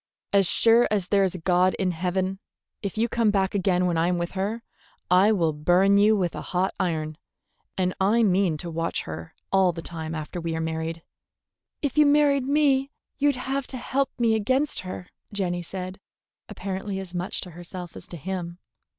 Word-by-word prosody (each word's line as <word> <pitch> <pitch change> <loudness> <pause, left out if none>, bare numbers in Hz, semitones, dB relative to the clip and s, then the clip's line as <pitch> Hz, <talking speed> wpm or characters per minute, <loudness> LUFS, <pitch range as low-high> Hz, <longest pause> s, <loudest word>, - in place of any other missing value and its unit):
As 195 -2 +5
sure 230 +5 +5
as 200 -4 0
there's 195 -2 +2
a - - -3
God 180 +2 +2
in 185 -2 0
heaven, 185 +2 -1 0.4
if 200 0 -4
you 230 +2 +2
come 230 -2 +2
back 195 -2 +1
again 185 -2 +2
when 170 -2 +1
I 165 - +2
am 180 0 +1
with 170 0 -2
her, 205 +4 -3 0.5
I'll 180 -3 +4
burn 180 +6 +4
you 210 +1 +5
with 180 -3 0
a - - -5
hot 185 +1 -1
iron; 155 -2 -2 0.6
and 185 -1 +1
I 220 +5 +4
mean 185 -5 +2
to 170 +2 -6
watch 165 +1 -2
her 80 +1 -8 0.2
all 190 -2 +4
the 165 0 -7
time 160 -1 -5
after 155 +3 -5
we 165 -1 -2
are - - -2
married." 160 0 -3 0.8
"If 285 +1 0
you 300 - +7
married 285 -2 +4
me, 280 -2 +3 0.3
you'd 285 -1 +3
have 265 +1 -3
to 260 - -5
help 270 +3 0
me 230 -2 +3
against 260 +7 +1
her," 185 0 -7 0.2
Jenny 180 -4 -1
said, 185 +2 -6 0.5
apparently 195 +1 -4
as 190 -2 -7
much 180 +1 -3
to 180 - -8
herself 175 +1 -8
as - - -10
to 175 - -8
him. 175 +1 -5
190 Hz, 185 wpm, -25 LUFS, 175-215 Hz, 0.8 s, you